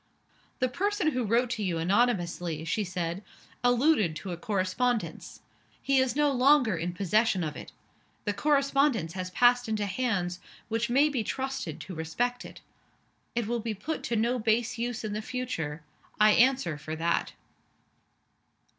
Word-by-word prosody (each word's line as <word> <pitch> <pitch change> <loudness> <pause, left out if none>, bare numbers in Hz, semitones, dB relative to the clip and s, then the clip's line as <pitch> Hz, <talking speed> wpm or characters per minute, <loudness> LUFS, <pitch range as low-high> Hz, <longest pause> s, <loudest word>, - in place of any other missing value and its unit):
"The 255 - +1
person 395 - 0
who 250 -2 -1
wrote 235 +3 +1
to 220 -4 -2
you 180 -4 -1
anonymously," 175 -4 0
she 210 +6 0
said, 180 0 -3 0.4
"alluded 245 - +3
to 185 +3 -6
a - - -2
correspondence. 210 +5 -2 0.4
He 275 -1 +2
is 260 -2 +1
no 295 -1 +3
longer 255 - +4
in 170 +2 -2
possession 200 +1 +2
of 150 -2 -4
it. - - -9 0.5
The 205 - 0
correspondence 275 - +2
has 185 0 -4
passed 245 +5 +3
into 215 -1 0
hands 185 -5 -1 0.3
which 230 +2 -1
may 275 +5 +4
be 270 -7 -1
trusted 260 - -4
to 185 - -8
respect 230 +10 -2
it. - - -11 0.7
It 235 -2 0
will 235 +2 -1
be 225 -1 -3
put 310 +11 -4
to 235 - -1
no 235 +3 +1
base 230 +2 0
use 240 -1 -3
in 215 -1 -3
the 215 - -2
future 165 -12 -4 0.4
I 215 0 +7
answer 235 - +3
for 155 +1 -5
that." 170 +1 0
225 Hz, 155 wpm, -28 LUFS, 180-250 Hz, 0.7 s, I